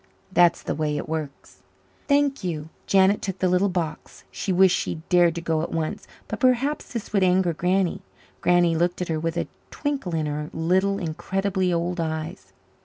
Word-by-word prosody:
That's 175 -2 +4
the - - -2
way 150 -1 -1
it - - -4
works." 155 -3 -6 0.5
"Thank 285 -3 +2
you." 160 -4 -3 0.2
Janet 195 +1 +4
took 190 -2 -3
the 185 - +1
little 180 +2 +3
box. 170 -4 -4
She 195 - -3
wished 185 0 +5
she 160 - -3
dared 175 -2 +4
to 170 - -4
go 160 -2 0
at 165 - -4
once. 160 -1 -3 0.2
But - - -5
perhaps 260 +3 +1
this 230 -3 -5
would 200 - +3
anger 180 -1 +3
Granny. 180 +2 0 0.4
Granny 175 -1 +3
looked 175 +2 0
at 180 - -7
her 160 -1 0
with 165 +1 -2
a - - 0 0.2
twinkle 275 - -3
in 155 -1 0
her 150 0 -3
little, 190 +5 +1
incredibly 190 +2 -1
old 175 +1 -1
eyes. 160 +2 -4
175 Hz, 180 wpm, -24 LUFS, 160-190 Hz, 0.5 s, wished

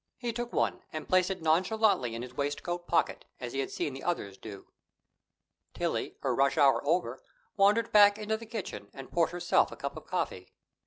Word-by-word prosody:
He 240 -2 -3
took 240 +1 -4
one, - - 0
and 155 -1 -6
placed 185 0 +3
it 190 -4 -4
nonchalantly 180 - +2
in 115 - -5
his 125 0 -9
waistcoat 175 +6 -3
pocket, 170 - +1 0.2
as 120 -1 -6
he 135 - -2
had 135 - -1
seen 145 - -3
the 135 - -8
others 100 - -2
do. 100 -1 -10 1.1
Tillie, - - -2
her - - 0
rush 140 +2 +2
hour 140 -3 +5
over, 150 -6 0 0.3
wandered 210 +3 +3
back 205 -1 +7
into 215 0 -1
the 225 0 -8
kitchen 190 - -6
and 135 -1 -9
poured 170 -2 +2
herself 175 0 +2
a - - -7
cup - - -4
of - - -10
coffee. - - -3
175 Hz, 195 wpm, -30 LUFS, 135-205 Hz, 1.1 s, back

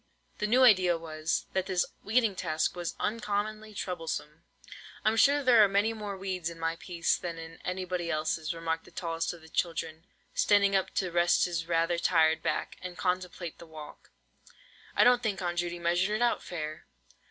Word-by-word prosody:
The 210 - 0
new 250 +4 +5
idea 185 -7 +6
was, 155 -1 -2
that 190 -1 0
this 185 -2 +1 0.2
weeding 225 -1 +2
task 160 -3 -1
was 175 -1 -4
uncommonly 215 0 -2
troublesome! 165 -4 -4 0.6
"I'm 215 +1 +3
sure 280 +6 +4
there 240 -4 +7
are - - +6
many 200 +3 +1
more 205 -3 -5
weeds 185 -3 -3
in 170 - -10
my 165 0 -1
piece 170 -1 0
than 170 -2 -5
in 165 0 -9
anybody 180 -1 -3
else's!" 155 0 -1
remarked 165 -1 -3
the - - -14
tallest 165 -1 -3
of 175 - -11
the 160 - -15
children, 165 0 -2 0.3
standing 200 -1 +4
up 190 - +1
to 185 -2 0
rest 175 0 +3
his 170 -2 -3
rather 170 0 +1
tired 160 -2 +3
back, - - -2
and 180 -1 -7
contemplate 180 -2 -3
the 170 - -11
walk. 155 -2 -11 0.9
"I - - +6
don't 245 0 +5
think 210 -5 -1
Aunt 175 -1 -2
Judy 175 0 -2
measured 175 +4 +1
it 215 - -2
out 240 - +2
fair!" 155 -3 -6
175 Hz, 180 wpm, -29 LUFS, 165-200 Hz, 0.9 s, there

